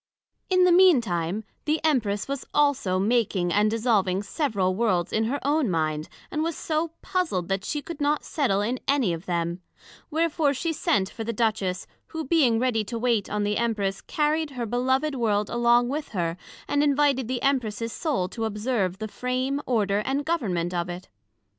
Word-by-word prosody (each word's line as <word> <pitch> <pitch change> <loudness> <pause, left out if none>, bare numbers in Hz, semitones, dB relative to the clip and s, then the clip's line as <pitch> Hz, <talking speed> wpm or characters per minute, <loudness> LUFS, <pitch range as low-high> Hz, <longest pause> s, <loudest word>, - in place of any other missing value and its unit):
In 370 -1 +4
the 360 - +5
mean 360 -4 +7
time 180 -1 -2 0.2
the 310 +1 +1
Empress 225 -10 +1
was 275 -1 -3
also 285 -11 +2
making 195 -4 +1
and 210 +1 +3
dissolving 215 -4 +1
several 200 - 0
Worlds 185 -5 0
in 220 0 +2
her 275 +5 -1
own 290 -4 +2
mind, 155 -2 -1 0.2
and 305 - -1
was 330 0 -2
so 320 +1 -1
puzled, 325 - -1
that 195 0 -1
she 295 -1 -3
could 330 -3 -7
not 290 +1 +1
settle 245 - 0
in 240 +4 -1
any 270 -10 +2
of 165 +1 -7
them; 170 0 -2 0.5
wherefore 315 -2 +1
she 325 +5 -1
sent 200 -10 +1
for 225 - -6
the 230 - -2
Duchess, 210 -5 0 0.2
who 320 -1 -5
being 260 -6 +3
ready 235 -2 +1
to 230 +3 -4
wait 230 -3 +1
on 210 0 -1
the 205 0 0
Empress, 210 -4 -1
carried 305 +1 0
her 250 -4 -4
beloved 260 +6 0
World 210 -5 0
along 240 0 +3
with 290 +3 -3
her, 170 -3 -1 0.3
and 290 0 +1
invited 280 -3 +2
the 250 -1 -3
Empress's 230 -5 0
Soul 275 - -1
to 225 +2 -3
observe 210 -3 -1
the 215 +1 -4
Frame, 255 +5 -2
Order 205 -5 +1
and 275 +4 -1
Government 185 - -1
of 175 0 -2
it. 175 +2 -7
235 Hz, 180 wpm, -25 LUFS, 200-285 Hz, 0.5 s, mean